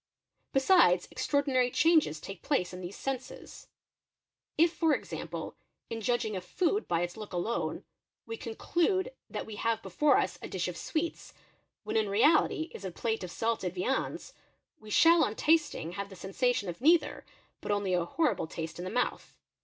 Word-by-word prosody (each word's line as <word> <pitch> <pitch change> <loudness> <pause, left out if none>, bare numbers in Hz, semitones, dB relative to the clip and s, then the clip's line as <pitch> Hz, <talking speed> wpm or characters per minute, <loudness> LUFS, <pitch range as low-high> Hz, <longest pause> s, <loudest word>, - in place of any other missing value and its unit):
Besides 270 - +4
extraordinary 275 -4 +1
changes 310 - +3
take 195 +3 -9
place 185 -12 0
in 180 - -7
these 180 +2 -7
senses. 265 -2 -6 0.9
If 335 +1 +4
for 320 -3 +3
example - - -6 0.3
ir 225 0 -3
judging 225 -2 0
of 185 - -4
food 370 - 0
by 170 -1 +1
its 175 +2 -3
look 210 -3 -8
alone, 200 +7 -2 0.4
we 225 - -5
conclude 350 - 0 0.2
that - - -4
we 215 -2 -8
have 225 0 0
before 285 +11 +3
us - - -1
a - - -6
dish - - -2
of - - -4
sweets 325 +1 -4 0.5
when - - -1
in 215 -2 +1
reality 305 +8 +3
it - - -6
is - - -14
a - - -2
plate 220 +4 -2
of 180 - -5
salted 205 -3 -2
viands, 250 +9 -2 0.5
we 215 - -13
shall 330 +8 +6
on 220 -5 -1
tasting 305 - +1
have 200 +2 -5
the 190 - -11
sensation 205 +4 -1
of 175 +4 -6
neither, 320 +2 +3 0.4
but - - -3
only 200 -2 0
a 175 -1 +2
horrible 210 - 0
taste 160 +1 -6
im 180 - -4
the - - -3
mouth. 245 +4 -2
225 Hz, 175 wpm, -30 LUFS, 185-295 Hz, 0.9 s, shall